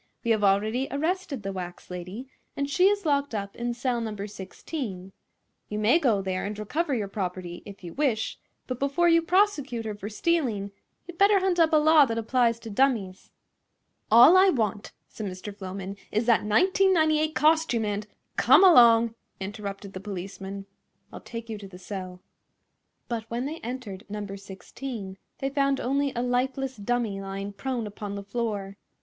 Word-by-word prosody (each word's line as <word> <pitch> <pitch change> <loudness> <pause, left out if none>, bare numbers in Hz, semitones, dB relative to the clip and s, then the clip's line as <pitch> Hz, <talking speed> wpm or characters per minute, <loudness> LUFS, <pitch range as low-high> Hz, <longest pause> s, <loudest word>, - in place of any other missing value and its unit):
We 235 - +1
have 215 -2 +2
already 215 +6 +2
arrested 315 - -2
the 195 - -3
wax 180 -1 -7
lady, 180 +8 -7 0.3
and 280 - 0
she 360 +6 +3
is 405 -2 +1
locked 280 -4 +1
up 200 -1 -4
in 240 0 -3
cell 245 -1 -1
No. 210 -3 -4
16. 195 - -7 0.6
You 210 - -3
may 220 +10 +4
go 225 - +2
there 185 -1 -2
and 205 +1 -4
recover 285 - -1
your 210 -4 -2
property, 180 -3 -5
if 200 -1 -11
you 170 - -7
wish, 260 -7 -1 0.3
but 255 -1 -5
before 280 +5 +2
you 335 -1 +5
prosecute 325 - +1
her 215 - -3
for 205 0 -7
stealing 220 -6 0 0.3
you'd 345 -1 -11
better 400 0 +6
hunt 370 -2 +1
up 325 -1 +5
a - - +4
law 305 -1 +6
that 230 -3 -3
applies 230 0 +2
to 225 - -8
dummies." 205 -6 0 0.8
"All 245 +10 +8
I 380 +1 +7
want," 220 - -1 0.2
said 215 - -6
Mr. 185 +2 -7
Floman, 195 0 -6 0.2
"is 215 +2 0
that 230 -3 +3
$19.98 315 - +3
costume 310 -7 +3
and—" 205 0 -3 0.3
"Come - - +6
along!" 235 -9 +7 0.3
interrupted 200 0 -6
the 185 - -6
policeman. 195 0 -6 0.5
"I'll - - -8
take 230 -1 -7
you 220 -2 -5
to 200 - -9
the 185 -2 -12
cell." 185 -1 -7 0.9
But 230 -2 -3
when 240 +2 -2
they 310 +3 -4
entered 230 -4 -6
No. 210 0 -4
16 195 +1 -8 0.2
they 270 - -2
found 275 -1 +1
only 275 +2 0
a 240 - -1
lifeless 260 +2 -1
dummy 215 -2 -1
lying 195 +1 -5
prone 235 +3 -3
upon 205 -1 -6
the 200 - -6
floor. 200 -2 -3
225 Hz, 170 wpm, -26 LUFS, 200-275 Hz, 0.9 s, All